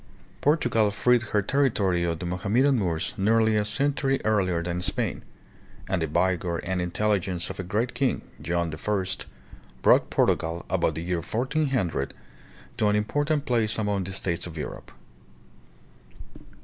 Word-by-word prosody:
Portugal 120 Hz, -8 st, +3 dB
freed 120 Hz, +4 st, +3 dB
her 105 Hz, -2 st, 0 dB
territory 100 Hz, -9 st, +1 dB
of 85 Hz, -1 st, -1 dB
the 90 Hz, -, -6 dB
Mohammedan 110 Hz, +9 st, +2 dB
Moors 85 Hz, -5 st, -1 dB
nearly 110 Hz, +2 st, +3 dB
a 105 Hz, -, +2 dB
century 135 Hz, +4 st, +1 dB
earlier 95 Hz, -6 st, +1 dB
than 90 Hz, +1 st, -2 dB
Spain; -, -, -1 dB, 0.7 s
and 95 Hz, -, 0 dB
the 80 Hz, -, 0 dB
vigor 90 Hz, +1 st, 0 dB
and 90 Hz, +2 st, -2 dB
intelligence 95 Hz, -1 st, 0 dB
of 95 Hz, -, -10 dB
a -, -, -2 dB
great 110 Hz, +7 st, -1 dB
king, 135 Hz, -3 st, 0 dB, 0.2 s
John 85 Hz, +1 st, -1 dB
I., 95 Hz, +4 st, -1 dB, 0.8 s
brought -, -, +5 dB
Portugal, 85 Hz, +1 st, +1 dB
about 85 Hz, -4 st, +1 dB
the 80 Hz, -, -4 dB
year 90 Hz, -1 st, -1 dB
1400, 125 Hz, -, -1 dB, 0.6 s
to 105 Hz, -, +2 dB
an 105 Hz, -, +3 dB
important 145 Hz, +8 st, 0 dB
place 115 Hz, -4 st, +1 dB
among 105 Hz, -3 st, 0 dB
the 95 Hz, -, -5 dB
states 90 Hz, -2 st, -2 dB
of 80 Hz, -2 st, -9 dB
Europe. 75 Hz, -, -6 dB
100 Hz, 145 wpm, -26 LUFS, 85-115 Hz, 0.8 s, brought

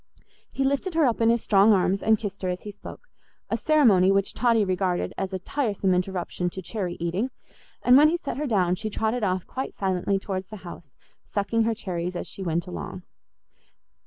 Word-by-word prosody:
He 270 Hz, -, -1 dB
lifted 280 Hz, +6 st, 0 dB
her 325 Hz, -2 st, +4 dB
up 235 Hz, -2 st, +1 dB
in 225 Hz, -, +5 dB
his 235 Hz, 0 st, +2 dB
strong 205 Hz, +1 st, +5 dB
arms 190 Hz, 0 st, +2 dB
and 220 Hz, 0 st, +4 dB
kissed 200 Hz, -2 st, -6 dB
her 185 Hz, -, -1 dB
as 180 Hz, 0 st, -4 dB
he 210 Hz, -, -6 dB
spoke, 205 Hz, -, -11 dB, 0.5 s
a -, -, +2 dB
ceremony 220 Hz, -12 st, +4 dB
which 195 Hz, 0 st, +1 dB
Totty 230 Hz, -4 st, +2 dB
regarded 185 Hz, -1 st, -1 dB
as 195 Hz, 0 st, -3 dB
a 190 Hz, -, -2 dB
tiresome 200 Hz, -2 st, -1 dB
interruption 180 Hz, -1 st, -1 dB
to 190 Hz, -, -7 dB
cherry 185 Hz, -3 st, -4 dB
eating; 175 Hz, +9 st, -1 dB, 0.5 s
and 245 Hz, -, +6 dB
when 300 Hz, +3 st, +7 dB
he 340 Hz, -, +1 dB
set 280 Hz, -7 st, -5 dB
her 300 Hz, +1 st, -2 dB
down 185 Hz, -7 st, +2 dB
she 200 Hz, +4 st, -3 dB
trotted 220 Hz, +3 st, -1 dB
off 185 Hz, -2 st, 0 dB
quite 265 Hz, +1 st, -5 dB
silently 190 Hz, 0 st, 0 dB
towards 190 Hz, -1 st, -4 dB
the 215 Hz, -, -8 dB
house, 170 Hz, -3 st, -10 dB, 0.3 s
sucking 220 Hz, +2 st, 0 dB
her 230 Hz, 0 st, +1 dB
cherries 180 Hz, -4 st, -4 dB
as -, -, -4 dB
she -, -, -9 dB
went 170 Hz, -2 st, -1 dB
along. 85 Hz, -4 st, -7 dB
195 Hz, 200 wpm, -25 LUFS, 185-230 Hz, 0.5 s, when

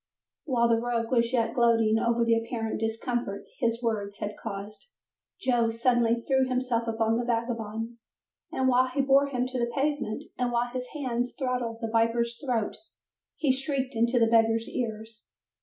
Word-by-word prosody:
While 240 Hz, -6 st, +2 dB
the 230 Hz, -1 st, +3 dB
rogue 235 Hz, -1 st, -1 dB
was 235 Hz, -1 st, +2 dB
yet 230 Hz, -3 st, +1 dB
gloating 225 Hz, -2 st, +3 dB
over 235 Hz, 0 st, +2 dB
the 230 Hz, -, +4 dB
apparent 230 Hz, -1 st, -2 dB
discomfort 225 Hz, -2 st, -2 dB
his 230 Hz, +1 st, 0 dB
words 205 Hz, -3 st, -2 dB
had 210 Hz, 0 st, -4 dB
caused, 210 Hz, -, -7 dB, 0.5 s
Joe 240 Hz, -9 st, +2 dB
suddenly 235 Hz, 0 st, +2 dB
threw 265 Hz, -1 st, +3 dB
himself 250 Hz, -2 st, 0 dB
upon 225 Hz, 0 st, +1 dB
the -, -, -1 dB
vagabond, 230 Hz, -1 st, -2 dB, 0.5 s
and 260 Hz, -, 0 dB
while 255 Hz, 0 st, +4 dB
he 265 Hz, +2 st, 0 dB
bore 275 Hz, +1 st, +4 dB
him 250 Hz, -3 st, -1 dB
to 255 Hz, 0 st, -3 dB
the 235 Hz, 0 st, 0 dB
pavement 275 Hz, -5 st, -1 dB, 0.2 s
and 250 Hz, -1 st, +1 dB
while 240 Hz, 0 st, 0 dB
his 250 Hz, -1 st, -3 dB
hands 245 Hz, -4 st, -2 dB
throttled 250 Hz, -4 st, -2 dB
the 225 Hz, -, -2 dB
viper's 235 Hz, +1 st, +1 dB
throat, 240 Hz, -6 st, -1 dB, 0.6 s
he 290 Hz, -4 st, +2 dB
shrieked 270 Hz, 0 st, -2 dB
into 235 Hz, +2 st, +2 dB
the 230 Hz, -, +5 dB
beggar's 225 Hz, 0 st, +3 dB
ears. 220 Hz, -2 st, -5 dB
235 Hz, 165 wpm, -28 LUFS, 225-250 Hz, 0.6 s, the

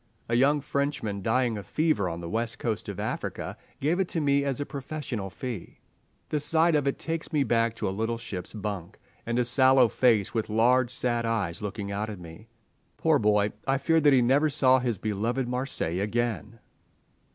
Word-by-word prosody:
A 115 Hz, -, -3 dB
young 140 Hz, +4 st, +3 dB
Frenchman, 140 Hz, -8 st, -2 dB
dying 115 Hz, +1 st, +1 dB
of 100 Hz, -, -11 dB
fever 155 Hz, -, +1 dB
on 85 Hz, 0 st, -5 dB
the 85 Hz, -, -6 dB
west 115 Hz, +4 st, -2 dB
coast 115 Hz, -7 st, -3 dB
of -, -, -6 dB
Africa, -, -, -4 dB, 0.2 s
gave 160 Hz, +6 st, +1 dB
it 190 Hz, -, +1 dB
to 170 Hz, -, -2 dB
me 140 Hz, -2 st, +2 dB
as 140 Hz, -2 st, -1 dB
a 145 Hz, -, -2 dB
professional 135 Hz, -8 st, -5 dB
fee. 115 Hz, -2 st, -7 dB, 0.5 s
The 150 Hz, -, 0 dB
sight 160 Hz, +3 st, +2 dB
of 145 Hz, -2 st, +2 dB
it 140 Hz, -, 0 dB
takes 165 Hz, 0 st, -4 dB
me 150 Hz, -3 st, +2 dB
back 115 Hz, -2 st, +1 dB
to -, -, -3 dB
a -, -, -1 dB
little 110 Hz, +3 st, -2 dB
ship's 95 Hz, -6 st, -6 dB
bunk, 100 Hz, -3 st, -5 dB, 0.3 s
and 120 Hz, 0 st, 0 dB
a 125 Hz, -, +2 dB
sallow 130 Hz, +1 st, +5 dB
face 110 Hz, -4 st, +2 dB
with 110 Hz, -2 st, -1 dB
large, 120 Hz, +3 st, +3 dB
sad 120 Hz, -1 st, -1 dB
eyes 100 Hz, -7 st, -1 dB
looking 100 Hz, 0 st, -4 dB
out 105 Hz, +2 st, -2 dB
at 105 Hz, -, -6 dB
me. 85 Hz, +6 st, -12 dB, 0.5 s
Poor 160 Hz, -3 st, +3 dB
boy, 105 Hz, -1 st, +2 dB, 0.2 s
I 135 Hz, 0 st, +3 dB
fear 160 Hz, +4 st, +2 dB
that 145 Hz, -1 st, +5 dB
he 130 Hz, -3 st, +5 dB
never 140 Hz, +5 st, +3 dB
saw 130 Hz, -3 st, +4 dB
his 120 Hz, -4 st, -1 dB
beloved 110 Hz, +6 st, -1 dB
Marseilles 125 Hz, -8 st, -1 dB
again! 115 Hz, +1 st, -2 dB
120 Hz, 195 wpm, -27 LUFS, 105-140 Hz, 0.5 s, sallow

